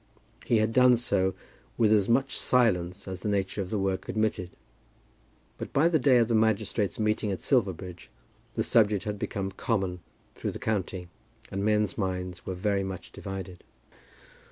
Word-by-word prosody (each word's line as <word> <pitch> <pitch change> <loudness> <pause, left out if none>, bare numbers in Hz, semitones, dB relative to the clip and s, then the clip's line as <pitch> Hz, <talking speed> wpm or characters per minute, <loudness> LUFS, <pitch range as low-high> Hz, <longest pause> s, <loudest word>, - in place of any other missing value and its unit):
He 115 - +3
had 110 +1 +1
done 125 -1 +6
so 95 -5 0 0.4
with 110 -2 +4
as 105 -1 +3
much 130 +3 +2
silence 100 -7 +1
as 95 -2 -5
the 105 - -3
nature 100 0 -1
of 95 - -5
the 110 - -1
work 95 -1 -2
admitted. 110 -5 -1 1.1
But - - -6
by 160 +5 +4
the 160 -2 +2
day 130 -1 +5
of 115 -2 +4
the 115 - 0
magistrates' 110 -2 +1
meeting 105 -1 0
at 95 - -3
Silverbridge 95 - -1 0.5
the - - +1
subject 105 -3 +3
had 105 -2 -4
become 95 -1 -3
common 95 -3 -1 0.3
through - - -4
the - - -5
county, 95 -4 -2 0.4
and 100 +1 -2
men's 105 -1 +1
minds 90 -2 -3
were 95 - -2
very 100 +1 0
much 95 -2 -6
divided. 95 -2 -7
100 Hz, 165 wpm, -28 LUFS, 95-110 Hz, 1.1 s, done